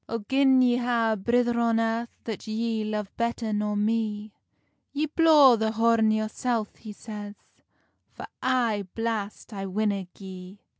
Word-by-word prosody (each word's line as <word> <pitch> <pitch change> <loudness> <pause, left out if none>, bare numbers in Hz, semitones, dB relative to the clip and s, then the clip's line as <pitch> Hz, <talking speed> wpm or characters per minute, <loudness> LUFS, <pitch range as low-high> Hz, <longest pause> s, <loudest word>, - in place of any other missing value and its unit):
"O 230 - -1
gin 265 -1 +4
ye 245 -1 +3
ha 240 -2 +1
a - - +1
brither 240 +3 +1
on 230 -1 +2
earth 230 +1 -1
That 220 -1 -6
ye 220 0 -2
love 210 -2 -4
better 235 -1 -2
nor 210 0 -1
me, 215 0 -1 0.6
Ye 295 +2 0
blaw 305 -5 +6
the 220 0 -1
horn 225 0 +3
yoursel," 220 +1 -1
he 215 - -10
says, 210 -1 -8 0.8
"For - - -9 0.2
ae 235 -6 0
blast 225 -1 -4
I 195 -1 -5
winna 200 0 -1
gie." 190 0 -10
225 Hz, 150 wpm, -26 LUFS, 210-235 Hz, 0.8 s, blaw